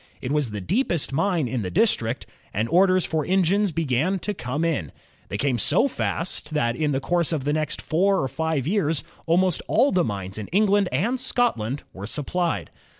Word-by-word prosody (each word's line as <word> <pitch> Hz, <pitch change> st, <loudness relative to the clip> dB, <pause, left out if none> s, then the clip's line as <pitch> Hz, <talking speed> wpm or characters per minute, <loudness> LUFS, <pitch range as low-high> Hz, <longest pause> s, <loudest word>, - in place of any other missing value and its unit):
It 125 Hz, -, -4 dB
was 150 Hz, -4 st, +1 dB
the 105 Hz, -1 st, -5 dB
deepest 170 Hz, -, 0 dB
mine 165 Hz, -2 st, +1 dB
in 125 Hz, 0 st, -2 dB
the 95 Hz, -, -3 dB
district, 130 Hz, -, +1 dB, 0.3 s
and 110 Hz, +3 st, 0 dB
orders 185 Hz, +1 st, +4 dB
for 160 Hz, -2 st, -1 dB
engines 190 Hz, +3 st, +2 dB
began 160 Hz, +4 st, 0 dB
to 210 Hz, -, -2 dB
come 145 Hz, -1 st, -2 dB
in. 140 Hz, -, -1 dB, 0.4 s
They -, -, -3 dB
came 130 Hz, -4 st, 0 dB
so 170 Hz, -, +4 dB
fast 165 Hz, -, -3 dB
that 120 Hz, -5 st, +1 dB
in 150 Hz, 0 st, 0 dB
the 135 Hz, -, 0 dB
course 175 Hz, +3 st, +1 dB
of 155 Hz, -5 st, -1 dB
the 145 Hz, +2 st, 0 dB
next 155 Hz, -1 st, -1 dB
four 190 Hz, +3 st, +2 dB
or -, -, 0 dB
JAMES -, -, -11 dB
WATT -, -, -20 dB
21 160 Hz, 0 st, +1 dB
five -, -, -6 dB
years 165 Hz, -6 st, +1 dB, 0.2 s
almost 180 Hz, +1 st, +2 dB
all 280 Hz, -, +3 dB
the 180 Hz, -2 st, +2 dB
mines 100 Hz, -, -4 dB
in 105 Hz, -, -6 dB
England 200 Hz, 0 st, +3 dB
and 225 Hz, -, 0 dB
Scotland 185 Hz, -, 0 dB
were 100 Hz, +2 st, -7 dB
supplied. 170 Hz, +7 st, -2 dB
160 Hz, 205 wpm, -24 LUFS, 130-185 Hz, 0.4 s, orders